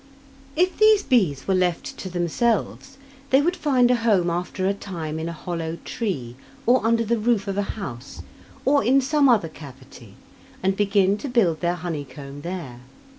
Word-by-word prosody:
If 365 Hz, +3 st, +1 dB
these 430 Hz, -2 st, +6 dB
bees 185 Hz, -, +1 dB
were 195 Hz, -, +2 dB
left 180 Hz, -2 st, 0 dB
to 190 Hz, -, -5 dB
themselves, 220 Hz, +9 st, -1 dB, 0.3 s
they 265 Hz, -, +5 dB
would 345 Hz, +5 st, +1 dB
find 255 Hz, -7 st, +3 dB
a 250 Hz, -, +3 dB
home 205 Hz, -7 st, +2 dB
after 180 Hz, +2 st, -3 dB
a 195 Hz, -, +2 dB
time 165 Hz, -6 st, -6 dB
in 165 Hz, +1 st, -3 dB
a -, -, -4 dB
hollow 165 Hz, 0 st, -4 dB
tree, 135 Hz, -, -4 dB, 0.3 s
or 250 Hz, 0 st, +4 dB
under 230 Hz, 0 st, +2 dB
the 235 Hz, +1 st, 0 dB
roof 220 Hz, -2 st, +1 dB
of 195 Hz, -, -2 dB
a 205 Hz, -, +1 dB, 0.2 s
house, 135 Hz, -, -7 dB, 0.4 s
or 280 Hz, -1 st, +3 dB
in 260 Hz, +5 st, +4 dB
some 280 Hz, +1 st, +3 dB
other 215 Hz, -9 st, +3 dB
cavity, 130 Hz, -8 st, -13 dB, 0.5 s
and 190 Hz, +1 st, +2 dB
begin 200 Hz, 0 st, +2 dB
to 280 Hz, -, -5 dB
build 190 Hz, -10 st, +2 dB
their 175 Hz, 0 st, 0 dB
honeycomb 145 Hz, -5 st, -7 dB
there. 165 Hz, -8 st, -6 dB
190 Hz, 175 wpm, -23 LUFS, 160-240 Hz, 0.5 s, these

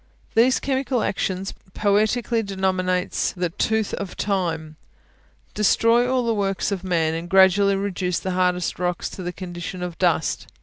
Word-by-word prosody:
These 245 Hz, +3 st, +4 dB
chemical 265 Hz, -3 st, -1 dB
actions, 190 Hz, 0 st, -2 dB, 0.2 s
poetically 215 Hz, +3 st, +1 dB
denominates 185 Hz, -2 st, -1 dB
the 180 Hz, -1 st, -1 dB
"tooth 220 Hz, +4 st, 0 dB
of 195 Hz, -2 st, -5 dB
time," 165 Hz, -6 st, -2 dB, 0.8 s
destroy 230 Hz, +4 st, +3 dB
all 255 Hz, -2 st, +1 dB
the 230 Hz, -, +1 dB
works 195 Hz, -2 st, -1 dB
of 190 Hz, -2 st, -3 dB
man, 165 Hz, -4 st, +1 dB
and 165 Hz, +2 st, -5 dB
gradually 195 Hz, +1 st, +5 dB
reduce 190 Hz, -2 st, -1 dB
the 190 Hz, -, -3 dB
hardest 180 Hz, -1 st, 0 dB
rocks 180 Hz, -1 st, -2 dB
to -, -, -8 dB
the 180 Hz, 0 st, -3 dB
condition 180 Hz, 0 st, -6 dB
of 175 Hz, -2 st, -6 dB
dust. 170 Hz, -4 st, +1 dB
190 Hz, 145 wpm, -23 LUFS, 180-210 Hz, 0.8 s, gradually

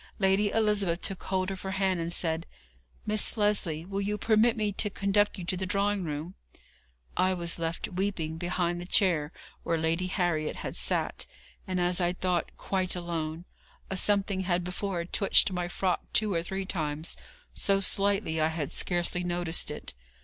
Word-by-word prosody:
Lady 195 Hz, +1 st, +3 dB
Elizabeth 205 Hz, -6 st, +2 dB
took 195 Hz, -, -3 dB
hold 190 Hz, 0 st, 0 dB
of 190 Hz, -, -6 dB
her 190 Hz, 0 st, -4 dB
hand, 190 Hz, -2 st, +1 dB
and 165 Hz, 0 st, -2 dB
said: 165 Hz, -1 st, -1 dB, 0.6 s
'Miss 215 Hz, +2 st, 0 dB
Lesley, 200 Hz, -7 st, +1 dB
will 195 Hz, +1 st, -3 dB
you 205 Hz, +1 st, -1 dB
permit 225 Hz, +2 st, +3 dB
me 210 Hz, -1 st, 0 dB
to 210 Hz, +2 st, +2 dB
conduct 200 Hz, +1 st, +1 dB
you 185 Hz, -, -5 dB
to 185 Hz, -, 0 dB
the 190 Hz, +1 st, -3 dB
drawing 200 Hz, 0 st, +1 dB
room?' 155 Hz, +2 st, -4 dB, 0.8 s
I 185 Hz, 0 st, +2 dB
was 170 Hz, -1 st, 0 dB
left 165 Hz, 0 st, -2 dB
weeping 180 Hz, -4 st, -2 dB
behind 175 Hz, 0 st, -1 dB
the 175 Hz, -, -7 dB
chair 170 Hz, -7 st, +3 dB, 0.3 s
where 165 Hz, -, 0 dB
Lady 165 Hz, +3 st, 0 dB
Harriet 175 Hz, -5 st, 0 dB
had -, -, -5 dB
sate, -, -, 0 dB, 0.4 s
and, 185 Hz, -1 st, -1 dB
as 180 Hz, +1 st, +3 dB
I 175 Hz, 0 st, +2 dB
thought, 180 Hz, -2 st, -1 dB
quite 185 Hz, -2 st, 0 dB
alone. 170 Hz, -1 st, -4 dB, 0.5 s
A -, -, -1 dB
something 200 Hz, 0 st, +2 dB
had 180 Hz, -1 st, 0 dB
before 180 Hz, -1 st, -3 dB
twitched 195 Hz, +2 st, +4 dB
my 180 Hz, -1 st, -2 dB
frock 180 Hz, +1 st, -1 dB
two 215 Hz, -2 st, +3 dB
or 165 Hz, -, +1 dB
three 190 Hz, +3 st, -4 dB
times, 155 Hz, -3 st, -2 dB, 0.4 s
so 195 Hz, -1 st, +4 dB
slightly 195 Hz, -4 st, +2 dB
I 155 Hz, -, +4 dB
had 160 Hz, -3 st, -3 dB
scarcely 175 Hz, 0 st, 0 dB
noticed 175 Hz, -1 st, +1 dB
it. -, -, -6 dB
185 Hz, 170 wpm, -29 LUFS, 170-195 Hz, 0.8 s, twitched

